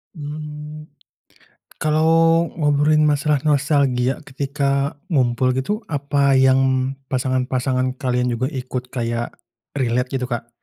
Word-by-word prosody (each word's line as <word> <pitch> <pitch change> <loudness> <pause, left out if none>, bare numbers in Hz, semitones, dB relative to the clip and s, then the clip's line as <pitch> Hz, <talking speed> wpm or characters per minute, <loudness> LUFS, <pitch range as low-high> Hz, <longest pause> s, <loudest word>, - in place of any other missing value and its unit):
Mmm. 150 0 -8 0.9
Kalau 165 +1 +3
ngobrolin 150 0 +3
masalah 150 0 +2
nostalgia 140 -3 +2
ketika 140 0 -1 0.2
ngumpul 130 -2 +2
gitu, 150 - -2
apa 140 -2 +1
yang 130 0 +5 0.5
pasangan-pasangan 130 0 -1
kalian 125 -1 0
juga 130 +3 -1
ikut 130 -3 -5
kayak 120 -1 -2 0.5
relate 125 -1 0
gitu 130 -1 -2
Kak, 120 -1 -5
140 Hz, 100 wpm, -21 LUFS, 130-150 Hz, 0.9 s, yang